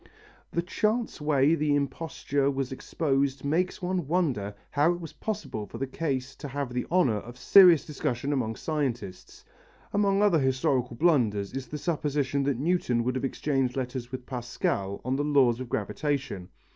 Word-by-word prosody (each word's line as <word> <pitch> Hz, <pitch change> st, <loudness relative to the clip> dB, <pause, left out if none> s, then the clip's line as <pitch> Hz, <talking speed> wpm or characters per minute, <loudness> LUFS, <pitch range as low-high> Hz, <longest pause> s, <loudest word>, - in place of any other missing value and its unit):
The 170 Hz, -, -1 dB
chance 215 Hz, +3 st, -1 dB
way 150 Hz, 0 st, +3 dB
the 150 Hz, -2 st, +2 dB
imposture 140 Hz, 0 st, -1 dB
was 135 Hz, -2 st, -2 dB
exposed 135 Hz, -1 st, -1 dB
makes 180 Hz, +6 st, 0 dB
one 180 Hz, -4 st, -1 dB
wonder 135 Hz, -, 0 dB, 0.2 s
how 150 Hz, +4 st, +3 dB
it 175 Hz, -, -6 dB
was 165 Hz, -3 st, -8 dB
possible 135 Hz, -, -4 dB
for 115 Hz, -, -8 dB
the 135 Hz, -, -1 dB
case 135 Hz, -2 st, -3 dB
to 145 Hz, -, -6 dB
have 140 Hz, -2 st, -4 dB
the 125 Hz, -, -2 dB
honour 155 Hz, -12 st, +3 dB
of 120 Hz, +4 st, -9 dB
serious 175 Hz, +4 st, +7 dB
discussion 135 Hz, -1 st, -2 dB
among 115 Hz, -5 st, -1 dB
scientists. 125 Hz, -, -4 dB, 0.5 s
Among 200 Hz, 0 st, +3 dB
other 190 Hz, -6 st, +4 dB
historical 130 Hz, -2 st, +1 dB
blunders 115 Hz, -, +2 dB
is 135 Hz, 0 st, -5 dB
the 150 Hz, -, -5 dB
supposition 145 Hz, -3 st, -1 dB
that 140 Hz, -3 st, +1 dB
Newton 140 Hz, -6 st, +1 dB
could 125 Hz, +2 st, 0 dB
have 130 Hz, -, -3 dB
exchanged 135 Hz, -1 st, -1 dB
letters 125 Hz, -1 st, -4 dB
with 130 Hz, -1 st, -6 dB
Pascal 120 Hz, -6 st, -2 dB
on 130 Hz, +1 st, 0 dB
the 145 Hz, -, 0 dB
laws 135 Hz, -5 st, +3 dB
of 130 Hz, -2 st, -6 dB
gravitation. 130 Hz, -4 st, -2 dB
140 Hz, 165 wpm, -28 LUFS, 125-155 Hz, 0.5 s, serious